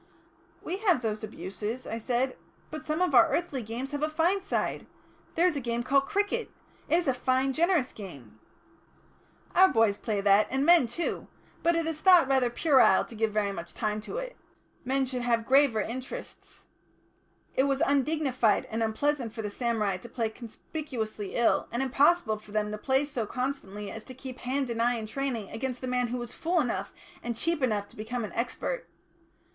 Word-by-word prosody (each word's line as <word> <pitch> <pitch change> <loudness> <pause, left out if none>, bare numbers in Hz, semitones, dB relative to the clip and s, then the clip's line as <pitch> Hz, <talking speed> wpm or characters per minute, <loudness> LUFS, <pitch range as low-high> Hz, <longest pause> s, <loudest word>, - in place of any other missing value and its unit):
"We 365 - -3
have 365 - +2
those 215 -1 -2
abuses," 215 +4 -5
I 225 - -4
said, 250 +3 0 0.4
"but 310 0 -7
some 310 +4 +1
of 360 - 0
our 240 -3 +7
earthly 330 -7 -1
games 235 +5 -5
have 290 0 -3
a 305 - +1
fine 340 +5 +1
side. 395 - -2 0.5
There 340 - +3
is 360 - +3
a - - -1
game 235 0 -2
called 275 +2 +2
cricket. 415 +3 0 0.4
It - - +4
is 345 -2 +1
a 265 - +3
fine, 260 +2 +1
generous 335 -3 +2
game." 135 - -11 1.1
"Our 375 +1 +7
boys 225 - +2
play 215 -3 -1
that, 200 +1 +4
and 270 +2 0
men 340 -6 +6
too. 285 +9 -3 0.3
But 340 0 +3
it 335 -1 0
is 320 -1 -4
thought 360 -7 +7
rather 265 -2 +3
puerile 265 +1 +4
to - - -13
give 220 0 0
very 205 -1 0
much 170 -3 -7
time 215 -2 -1
to 235 - -6
it; - - -5 0.5
men 265 +1 +1
should 250 -1 -3
have 235 -2 +1
graver 265 -4 +4
interests. 260 - -7 0.9
It 265 - +3
was 275 +2 +1
undignified 275 -6 +2
and 225 +1 -2
unpleasant 235 +2 0
for 225 - -4
the 210 - -3
samurai 215 -5 0
to 235 +6 -11
play 230 -2 -1
conspicuously 225 - -6
ill, 235 - +2
and 240 +3 -1
impossible 270 -3 +3
for 215 -1 -15
them 210 0 -1
to 210 - -4
play 265 +4 +2
so 245 -7 -3
constantly 210 -6 -4
as 225 - -8
to 255 - -10
keep 260 0 -8
hand 260 0 -1
and 230 0 -1
eye 240 +1 +3
in 225 -2 -4
training 235 -3 -3
against 255 +1 -3
the - - -5
man 250 -1 0
who 245 +2 -3
was 240 -1 -5
fool 345 +2 0
enough 210 -9 -1 0.3
and 235 0 -3
cheap 335 +1 0
enough 210 -5 0
to - - -17
become 225 +2 -3
an 210 - -9
expert. 255 - -3
250 Hz, 195 wpm, -28 LUFS, 220-290 Hz, 1.1 s, our